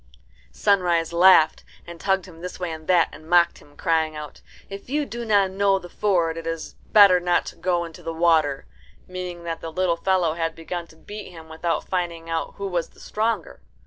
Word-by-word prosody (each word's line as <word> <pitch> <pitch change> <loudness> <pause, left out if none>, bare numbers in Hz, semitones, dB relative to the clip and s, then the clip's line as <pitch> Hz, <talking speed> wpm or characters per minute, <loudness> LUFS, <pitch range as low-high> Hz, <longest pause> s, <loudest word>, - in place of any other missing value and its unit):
Sunrise 175 -5 +1
laughed, 170 -2 +5 0.2
and 170 -1 -10
tugged 190 -1 +1
him 165 -3 -14
this 180 +1 -7
way 180 -2 -3
and 160 -1 -8
that, 175 -3 +4
and 155 +1 -13
mocked 175 -1 +4
him, 145 - -20
crying 160 -1 +1
out, 150 -1 -9 0.3
"If 195 +3 -9
you 295 +2 0
do 235 -2 -6
not 200 -3 +3
know 195 0 +2
the 180 -2 -9
ford, 170 -5 0
it 165 0 -6
is 165 -1 -4 0.2
better 200 -4 +7
not 175 0 +1
to - - -24
go 175 -2 0
into 165 -1 -11
the 165 - -4
water," 160 -4 +2 0.4
meaning 180 -1 -6
that 165 -1 -4
the 165 - -6
little 175 0 0
fellow 180 -3 +1
had 165 0 -2
begun 170 +1 -6
to 160 - -18
beat 205 +5 -9
him 165 -3 -13
without 165 0 -2
finding 170 -3 -3
out 165 0 -3
who 200 - -5
was 175 -3 -2
the - - -22
stronger. 225 +2 -2
175 Hz, 205 wpm, -23 LUFS, 165-190 Hz, 0.4 s, better